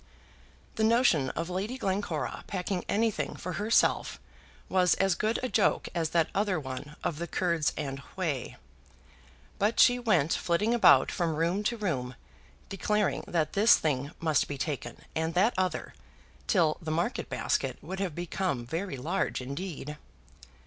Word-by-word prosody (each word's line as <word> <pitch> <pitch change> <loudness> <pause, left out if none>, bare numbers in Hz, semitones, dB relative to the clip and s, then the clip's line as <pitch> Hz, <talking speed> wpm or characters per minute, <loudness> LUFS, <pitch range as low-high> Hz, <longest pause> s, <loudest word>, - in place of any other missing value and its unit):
The 220 - +1
notion 220 - +4
of 165 +2 -2
Lady 200 +8 -3
Glencora 200 -4 -2
packing 185 -1 -2
anything 220 +1 0
for 180 - -5
herself 220 +2 +2 0.5
was 180 -1 +3
as 195 -1 +2
good 215 +6 0
a - - +1
joke 220 -4 +1
as 165 -3 0
that 165 -1 +1
other 200 -4 +1
one 140 +2 -7
of 150 - -2
the 170 - -3
Kurds 170 -4 +1
and 135 -2 -3 0.2
whey. 155 -9 -2 1.0
But 210 +3 +1
she 245 0 +6
went 190 - +2
flitting 205 +7 +1
about 240 - +6
from 170 -4 -1
room 170 +5 +1
to 235 +2 0
room, 130 - -2 0.5
declaring 210 +1 0
that 160 -3 0
this 215 +4 +6
thing 140 -3 -1
must 160 -2 +2
be 145 - -5
taken, 140 +1 -4 0.2
and 160 +1 -1
that 210 +7 +4
other, 185 -1 -1 0.5
till 165 -7 +3
the 160 - -5
market 170 +9 -1
basket - - -1
would 190 +1 -5
have 185 -6 -2
become 175 -7 -2
very 165 +4 -3
large 165 +10 -1
indeed. 150 +2 -6
175 Hz, 150 wpm, -29 LUFS, 155-200 Hz, 1.0 s, she